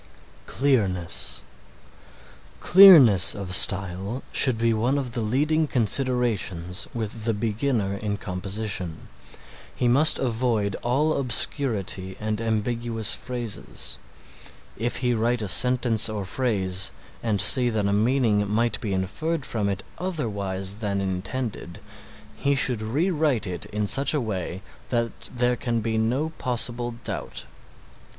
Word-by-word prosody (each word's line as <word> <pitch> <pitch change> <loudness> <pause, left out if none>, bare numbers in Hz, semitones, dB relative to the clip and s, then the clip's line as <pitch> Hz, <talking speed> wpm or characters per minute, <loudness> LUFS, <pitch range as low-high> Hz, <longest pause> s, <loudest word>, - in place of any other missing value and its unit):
CLEARNESS 90 - 0 1.2
Clearness 160 - +7
of 95 -2 -5
style 95 +4 +4
should 130 -4 +4
be 115 0 +1
one 120 +6 0
of 130 -4 -3
the 115 - -3
leading 150 +8 0
considerations 115 -8 0
with 110 -1 -5
the 115 -2 0
beginner 110 -2 -2
in 100 0 -3
composition. 95 -2 -4 0.7
He 125 - 0
must 140 +6 +4
avoid 115 -5 -1
all 145 +6 0
obscurity 110 -7 0
and 110 +1 -3
ambiguous 115 0 -1
phrases. 100 - -3 0.8
If 120 +2 -3
he 125 - +2
write 115 0 0
a - - -3
sentence 120 0 +3
or 105 -2 -4
phrase 100 -5 -1 0.3
and 110 -3 -1
see 120 +6 +6
that 110 -3 -1
a 100 - 0
meaning 110 -2 +1
might 115 +1 0
be 100 -3 -3
inferred 135 - -3
from 105 -3 -2
it 95 -1 -4 0.2
otherwise 100 - -3
than 100 -3 -2
intended, 95 +1 -5 0.6
he 140 0 0
should 125 -4 +2
re 145 - -1
write 150 -9 0
it 90 -3 -5
in 105 0 -3
such 140 +8 +1
a - - +1
way 95 -5 -5 0.3
that 115 -2 -1 0.2
there 125 0 0
can 120 -1 -2
be 110 0 -2
no 130 +8 0
possible 120 -1 -2
doubt. - - -6
110 Hz, 130 wpm, -24 LUFS, 100-125 Hz, 1.2 s, Clearness